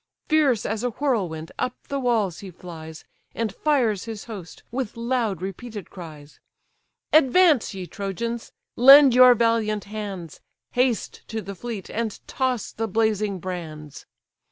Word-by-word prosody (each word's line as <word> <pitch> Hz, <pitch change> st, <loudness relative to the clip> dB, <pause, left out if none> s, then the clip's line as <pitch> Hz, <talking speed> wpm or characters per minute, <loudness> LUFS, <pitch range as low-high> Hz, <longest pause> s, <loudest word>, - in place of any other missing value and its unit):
Fierce 290 Hz, -8 st, +3 dB
as 220 Hz, +2 st, -2 dB
a 245 Hz, -, +1 dB
whirlwind 200 Hz, -, -2 dB
up 250 Hz, -, -1 dB
the 280 Hz, -, -1 dB
walls 225 Hz, -9 st, 0 dB
he 195 Hz, -, -8 dB
flies, 160 Hz, -3 st, -10 dB, 0.3 s
And 225 Hz, -4 st, -2 dB
fires 240 Hz, -10 st, +1 dB
his 220 Hz, -3 st, -6 dB
host 195 Hz, -8 st, -9 dB
with 245 Hz, -3 st, -4 dB
loud 230 Hz, -6 st, -1 dB
repeated 205 Hz, +2 st, -7 dB
cries. 155 Hz, -5 st, -11 dB, 0.7 s
"Advance, 310 Hz, -, +5 dB
ye 185 Hz, -1 st, -5 dB
Trojans! 225 Hz, +5 st, -4 dB, 0.2 s
lend 275 Hz, +1 st, +9 dB
your 250 Hz, 0 st, +8 dB
valiant 225 Hz, -2 st, +1 dB
hands, 200 Hz, -6 st, -7 dB, 0.3 s
Haste 250 Hz, -2 st, 0 dB
to 225 Hz, -, -4 dB
the 200 Hz, -1 st, -6 dB
fleet, 215 Hz, -1 st, -6 dB
and 225 Hz, -2 st, -3 dB
toss 255 Hz, -4 st, -1 dB
the 225 Hz, 0 st, -3 dB
blazing 215 Hz, -1 st, 0 dB
brands!" 160 Hz, -5 st, -7 dB
220 Hz, 135 wpm, -24 LUFS, 190-245 Hz, 0.7 s, lend